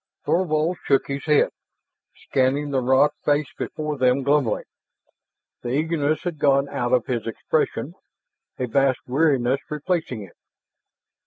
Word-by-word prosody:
Thorvald 170 -1 +1
shook 135 -1 +2
his 140 0 -5
head, 150 -2 +3 0.6
scanning 140 +3 0
the 135 -2 +1
rock 130 +4 +4
face 145 -1 +1
before 150 -2 -4
them 130 +1 +3
glumly. 140 -5 +1 1.0
The 120 - -5
eagerness 155 +2 0
had 170 -4 -4
gone 140 -1 +3
out 120 0 -2
of 125 -2 +3
his 120 -3 -3
expression, 115 - -1 0.6
a 130 - -1
vast 135 +1 +1
weariness 135 -2 +2
replacing 150 - -2
it. 95 - -14
140 Hz, 130 wpm, -23 LUFS, 130-150 Hz, 1.0 s, rock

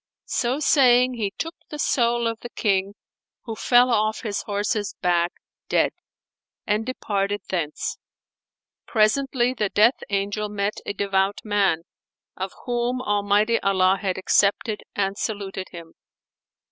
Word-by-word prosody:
So 250 +4 0
saying, 255 -4 +4
he 215 -5 -2
took 330 +1 -3 0.2
the 300 - -6
soul 240 -4 +1
of 230 -1 -1
the 240 - -8
King 200 -3 0 0.5
(who 225 -2 -5
fell 245 +2 +4
off 215 -1 +1
his 210 -3 -2
horse's 205 0 -2
back 175 -1 +2 0.4
dead) - - +3 0.7
and 210 +2 0
departed 205 -5 -2
thence. 165 -5 -3 0.9
Presently 245 +3 +2
the 210 -5 -1
Death 220 +6 +4
Angel 205 +1 -1
met 205 0 -2
a - - -1
devout 195 0 0
man, 200 -6 +1 0.5
of 190 0 -4
whom 245 +1 -1
Almighty 205 0 +2
Allah 190 -1 +2
had 190 -3 -1
accepted, 205 +3 +2
and 195 0 -1
saluted 195 -3 -4
him. 165 -1 -11
210 Hz, 130 wpm, -24 LUFS, 195-240 Hz, 0.9 s, saying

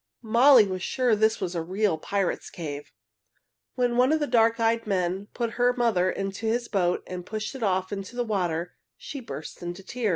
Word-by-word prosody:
Molly 235 +1 +6
was 185 -2 -4
sure 250 +2 +1
this 220 +1 +2
was 175 - -3
a 170 - -2
real 190 +2 0
pirates' 195 +4 -2
cave. 145 -4 -7 0.8
When 245 -1 +1
one 255 +3 +4
of 315 - +3
the 295 - 0
dark 230 -3 +3
eyed 230 0 +1
men 190 0 -1
put 235 -2 -1
her 245 0 +4
mother 225 -7 +2
into 195 +3 -3
his 235 +2 0
boat 180 -3 0
and 180 -1 -6
pushed 215 +5 -5
it 265 - -8
off 190 -2 0
into 195 +3 -6
the 245 0 -1
water, 175 -5 -1 0.2
she 285 - -7
burst 225 - -8
into 175 +2 -6
tears. 235 +2 -2
210 Hz, 195 wpm, -26 LUFS, 185-235 Hz, 0.8 s, Molly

